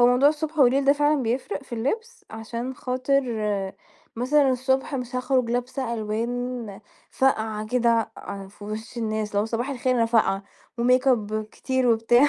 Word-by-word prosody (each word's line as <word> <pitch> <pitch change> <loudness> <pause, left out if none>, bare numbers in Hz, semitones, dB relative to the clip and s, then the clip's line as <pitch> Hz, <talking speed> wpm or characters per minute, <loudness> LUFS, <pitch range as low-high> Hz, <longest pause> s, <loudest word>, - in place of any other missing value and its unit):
هو 240 - +7
موضوع 250 +4 +5
الصبح 310 +1 -3
والليل 270 0 +5
ده 280 - +6
فعلًا 295 -1 +2
بيفْرِق 255 - -2
في 270 - -7
اللبس، 440 - -3
عشان 230 +3 -5
خاطر 255 +2 0 0.9
مثلًا 270 +3 +3
الصبح 265 +2 0
مش 250 -1 -3
هاخرج 255 -1 +1
لابسه 245 0 -2
ألوان 230 0 -3 0.3
فاقْعة 220 -5 +1
كده 230 -1 +2
أع 195 -1 -7
في 205 +1 -13
وِش 220 +3 -6
الناس 215 -2 -1
اللي 205 - +1
هو - - -1
صباح 235 +4 -2
الخير 255 -1 0
أنا 230 -1 +3
فاقْعة، 200 -4 +2 0.4
وميك 250 +2 +3
اب 215 -3 +1
كتير 260 +4 -1
وبتاع 240 +4 +5
245 Hz, 160 wpm, -25 LUFS, 225-265 Hz, 0.9 s, هو